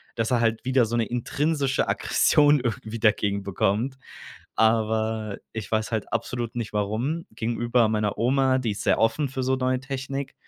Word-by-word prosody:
dass 115 +2 -1
er 120 -2 +3
halt 115 +1 0
wieder 130 -2 +3
so 120 +2 -3
'ne 115 - +1
intrinsische 140 +4 0
Aggression 145 -1 +3
irgendwie 115 -1 -4
dagegen 100 -2 +1
bekommt. 105 +7 0 0.6
Aber, 110 -1 +1 0.2
ich 110 -2 -6
weiß 110 -1 0
halt 110 -3 -3
absolut 115 0 -3
nicht, 120 -3 -4
warum. 110 +11 -1
Gegenüber 120 0 +1
meiner 105 -1 -1
Oma, 130 +2 +2
die 120 -5 -1
ist 100 - -6
sehr - - +2
offen 115 +6 +1
für 130 0 -4
so 130 +1 +1
neue 130 0 0
Technik. 135 0 -5
115 Hz, 165 wpm, -25 LUFS, 110-130 Hz, 0.6 s, er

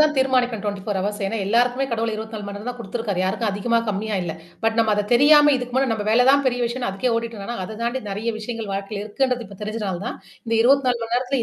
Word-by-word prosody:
தான் 305 0 +4
தீர்மானிக்கணும், 250 -5 +1
24 205 -1 -2
ஹவர்ஸ். 205 +2 -3
ஏன்னா, 225 - -2
எல்லாருக்குமே 245 +5 +2
கடவுள் 225 0 0
24 220 -1 -6
மணி 200 0 -6
நேரம் 210 +4 -6
தான் 245 - -9
குடுத்துருக்காரு, 210 -3 -3
யாருக்கும் 210 +3 0
அதிகமா 220 +4 +1
கம்மியா 210 +1 -1
இல்ல. 165 -2 -4 0.3
பட் 225 0 +2
நம்ம 225 -1 +4
அத 205 0 -1
தெரியாம 295 +3 +7
இதுக்கு 250 -1 -5
முன்ன 265 -1 +2
நம்ம 210 -2 -3
வேலை 240 +3 +5
தான் 280 0 +4
பெரிய 245 -1 +1
விஷயம்னு 240 -2 -2
அதுக்கே 215 +6 -1
ஓடிட்ருந்தோம்னா, 230 0 -4
அத 215 +3 -8
தாண்டி 240 +2 -1
நெறைய 210 +4 -3
விஷயங்கள் 225 -1 -5
வாழ்க்கையில 200 +1 -4
இருக்குன்றது 250 +2 -1
இப்ப 195 0 -13
தெரிஞ்சனால 210 -4 -3
தான், - - -4 0.3
இந்த 230 -1 -1
24 255 -1 +3
மணி 230 +1 -2
நேரத்தில 255 0 0
230 Hz, 220 wpm, -22 LUFS, 205-250 Hz, 0.3 s, தெரியாம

